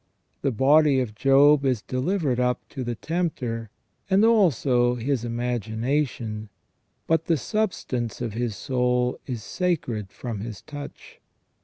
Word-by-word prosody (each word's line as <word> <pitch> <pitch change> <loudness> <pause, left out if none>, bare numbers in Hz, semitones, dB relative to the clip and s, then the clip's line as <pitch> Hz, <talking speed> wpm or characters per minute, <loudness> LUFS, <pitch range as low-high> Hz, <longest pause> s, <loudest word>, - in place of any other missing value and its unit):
The 140 - +1
body 140 +3 +4
of 120 -4 -2
Job 140 +4 +5
is 125 -6 +1
delivered 135 -1 -1
up 125 -1 0
to 130 - -5
the 120 -1 -3
tempter, 125 - -3 0.4
and 195 +3 +5
also 135 - +3
his 125 0 -1
imagination, 115 -1 -2 0.6
but 165 0 +1
the 165 - +2
substance 130 - -2
of 115 -4 -3
the 120 +2 -1
soul 125 +2 0
is 120 -5 -4
sacred 125 - -2
from 115 -5 -5
his 110 -1 -7
touch. 145 -1 -10
125 Hz, 130 wpm, -25 LUFS, 115-150 Hz, 0.6 s, Job